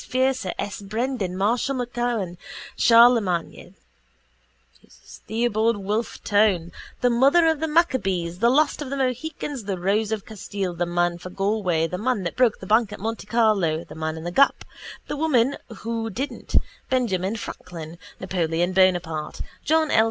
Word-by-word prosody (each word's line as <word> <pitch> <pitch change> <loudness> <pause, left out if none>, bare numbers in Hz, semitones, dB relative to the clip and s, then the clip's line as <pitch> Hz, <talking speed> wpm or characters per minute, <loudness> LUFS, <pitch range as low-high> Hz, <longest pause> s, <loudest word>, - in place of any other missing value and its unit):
Fursa, 260 -6 0
S. 205 - -4
Brendan, 215 -2 -2
Marshal 235 +7 +1
MacMahon, 240 -7 -2 0.4
Charlemagne, 230 -7 +3 1.5
Theobald 225 0 +1
Wolfe 210 +4 -3
Tone, 200 -5 +2 0.3
the 245 - +3
Mother 275 +8 +5
of 320 -2 +2
the 320 - -1
Maccabees, 195 - +1
the 235 +3 +4
Last 295 +4 +2
of 285 - -5
the 275 - -3
Mohicans, 265 -1 -3
the 195 -2 -2
Rose 200 +4 0
of 215 -3 -3
Castile, 200 -3 -4
the 175 0 -2
Man 175 0 0
for 185 - -8
Galway, 195 -4 0
The 180 +2 -4
Man 225 -3 0
that 175 - -4
Broke 250 -4 +2
the - - -9
Bank 220 0 +3
at 210 - -7
Monte 225 +1 -4
Carlo, 210 -8 +2
The - - -12
Man 160 0 -4
in 160 - -7
the 175 - -4
Gap, 275 +9 +3 0.4
The - - -3
Woman 280 -4 +2 0.3
Who 225 0 -3
Didn't, 260 +8 -5 0.3
Benjamin 210 -6 0
Franklin, 170 -6 -8 0.2
Napoleon 175 -1 -1
Bonaparte, 175 -5 +1 0.2
John 315 0 +2
L. - - +4
215 Hz, 150 wpm, -24 LUFS, 180-245 Hz, 1.5 s, Mother